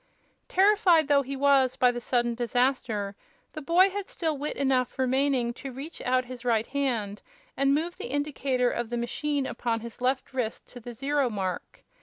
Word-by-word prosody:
Terrified 380 -5 +4
though 285 -1 +4
he 275 +1 -5
was 275 -2 +3
by 250 -1 +4
the 240 0 -5
sudden 240 -1 0
disaster, 235 -4 -1 0.4
the 310 - -6
boy 355 +6 +4
had 405 0 -5
still 320 -3 -2
wit 290 +2 -4
enough 265 -2 +1
remaining 260 -2 +1
to 270 +2 -8
reach 280 +6 -8
out 255 0 +1
his 250 -1 -9
right 230 -3 +1
hand 235 -8 -2 0.3
and 275 +1 +3
move 335 +4 -2
the - - -6
indicator 270 -3 0
of 240 -1 -3
the 240 - -2
machine 280 +4 -1
upon 230 -3 -2
his 235 +1 -10
left 260 +1 -1
wrist 245 -4 -3
to 245 - -10
the 240 +1 -8
zero 275 +2 0
mark. 190 -4 -5
260 Hz, 180 wpm, -27 LUFS, 240-285 Hz, 0.4 s, Terrified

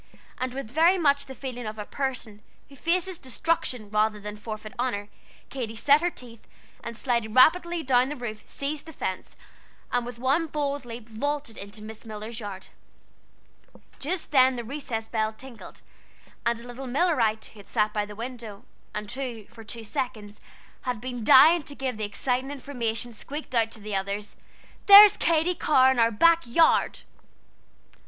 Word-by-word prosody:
And 255 0 -3
with 270 -5 -6
very 330 +6 +4
much 285 -4 +2
the 265 - -9
feeling 245 -4 -6
of 215 0 -6
a 210 - -5
person 250 -6 -4 0.3
who 280 - -14
faces 350 +4 0
destruction 255 -5 -2
rather 215 0 +1
than 210 0 -7
forfeit 215 +1 -8
honor, 210 -5 -2 0.4
Katy 235 -5 -5
set 285 +6 +4
her 350 - +1
teeth, 235 -8 -12 0.4
and 235 - -6
sliding 235 -4 -1
rapidly 340 +5 +4
down 255 0 +3
the 295 - -4
roof, 225 -5 -6
seized 290 +3 -4
the 320 - -9
fence, 185 -8 -5 0.6
and 245 0 +1
with 245 0 -8
one 275 +7 +1
bold 285 -3 -2
leap 230 -1 -9
vaulted 280 +2 -3
into 205 +1 -9
Miss 220 0 -10
Miller's 220 +1 -7
yard. 200 -3 -8 1.3
Just 330 +3 -3
then 260 -2 +5
the 240 - -4
recess 230 -3 -5
bell 220 -1 -1
tinkled; 245 +1 -12 0.6
and 235 0 +1
a 235 - -11
little 255 +2 -7
Millerite 245 -6 +1
who 205 -2 -13
sat 210 0 0
by 210 - 0
the 205 0 -9
window, 230 -2 -8 0.3
and 210 0 -4
who, 240 -4 -5
for 225 0 -13
two 230 +1 -7
seconds, 215 -2 -5 0.4
had 250 -3 -3
been 245 0 -5
dying 320 +9 +7
to 285 0 -9
give 260 -5 -3
the 215 - -2
exciting 250 +5 -2
information, 245 -4 -3
squeaked 285 +6 -8
out 225 -2 +3
to 225 - -10
the 210 -1 -5
others: 200 +2 -3 0.5
"There's 405 0 +11
Katy 330 +2 +2
Carr 265 -6 +4
in 260 - 0
our 230 0 +5
back 335 +10 +4
yard!" 320 +8 +3
245 Hz, 170 wpm, -26 LUFS, 220-280 Hz, 1.3 s, There's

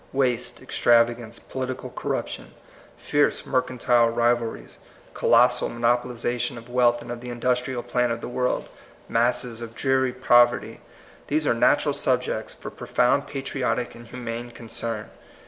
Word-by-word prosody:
Waste, 125 -2 -1
extravagance, 115 -1 +2
political 130 -1 -5
corruption, - - -4 0.4
fierce 145 0 +1
mercantile 125 -2 +2
rivalries, 120 0 -1 0.3
colossal - - +4
monopolization 120 +1 -1
of 115 0 -11
wealth 120 -1 +3
and 120 - -8
of 120 0 -6
the 125 - -7
industrial 125 +1 -1
plant 120 0 0
of 115 - -2
the - - -6
world, 125 +1 -1 0.4
masses 120 0 0
of 115 -1 -8
dreary 130 -1 +1
poverty, 120 -1 +3 0.2
— - - -24
these 155 +1 +1
are - - +3
natural 115 - +3
subjects - - 0
for - - -9
profound 140 +3 +1
patriotic 135 -3 -2
and 120 0 -13
humane 120 -1 -6
concern. 115 -2 -4
120 Hz, 130 wpm, -24 LUFS, 120-125 Hz, 0.4 s, colossal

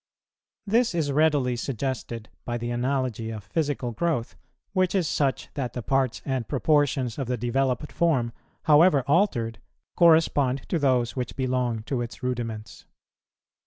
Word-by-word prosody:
This 225 -1 +2
is 155 -4 0
readily 145 -4 +2
suggested 120 -2 -4 0.2
by 120 0 -3
the 120 0 -4
analogy 125 -2 -1
of 110 -3 -6
physical 140 +1 -2
growth, 125 -1 -1 0.4
which 185 0 +1
is 180 -4 +2
such 140 -3 0
that 125 -4 -3
the 125 - -5
parts 135 0 0
and 130 -4 -2
proportions 140 -3 +1
of 135 - -2
the 125 0 -1
developed 125 +4 -1
form, 130 -9 +1 0.3
however 150 -2 +5
altered, 135 - +1 0.4
correspond 155 -6 +3
to 170 - +1
those 125 -4 +1
which 125 -2 -4
belong 125 -4 -1
to 125 +1 -2
its 120 +2 -7
rudiments. 115 -4 -4
130 Hz, 140 wpm, -26 LUFS, 120-150 Hz, 0.4 s, however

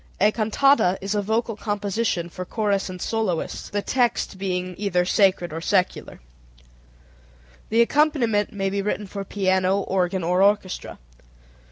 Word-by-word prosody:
A 210 +2 +4
cantata 220 -2 +3
is 195 +2 -3
a 205 - +1
vocal 225 +2 -1
composition 205 -3 -2
for 180 +1 -7
chorus 200 0 -1
and 185 0 -7
soloists, 210 -5 -2
the 205 0 -2
text 240 -6 0
being 185 -1 -2
either 180 -4 +1
sacred 185 -3 +2
or 165 - -4
secular. 185 +1 -1 1.5
The 225 +2 +4
accompaniment 235 -6 +2
may 195 -1 -2
be 200 0 -1
written 210 +1 -2
for 200 +1 -6
piano, 190 0 +1
organ, 185 -1 -1
or 180 +2 +1
orchestra. 200 -2 +1
200 Hz, 140 wpm, -23 LUFS, 185-215 Hz, 1.5 s, A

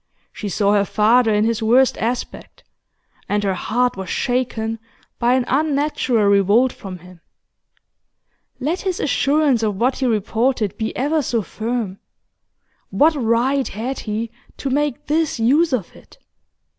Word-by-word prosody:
She 210 - -6
saw 200 +2 +1
her 205 -1 +3
father 220 +3 +3
in 210 0 +2
his 230 0 0
worst 250 +4 +4
aspect, 240 +2 -4 0.7
and 205 0 0
her 195 -1 +1
heart 245 +6 0
was 190 -1 -6
shaken 230 -3 -1 0.4
by 240 +2 +3
an 255 -2 +1
unnatural 280 -5 +1
revolt 200 +6 +3
from 190 -2 -8
him. 180 0 -16 1.4
Let 310 +8 -2
his 375 -2 -2
assurance 285 -3 +2
of 210 -3 0
what 250 +6 0
he 260 - +1
reported 225 0 0
be 220 0 -4
ever 300 +4 +1
so 235 -5 -1
firm, 220 -2 -4 0.9
what 315 +3 +3
right 260 +1 +1
had 240 +6 -4
he 220 +1 -4 0.3
to 270 - -3
make 290 -2 -1
this 310 -4 0
use 290 +8 +3
of 235 -9 -3
it? - - -18
235 Hz, 145 wpm, -20 LUFS, 210-270 Hz, 1.4 s, worst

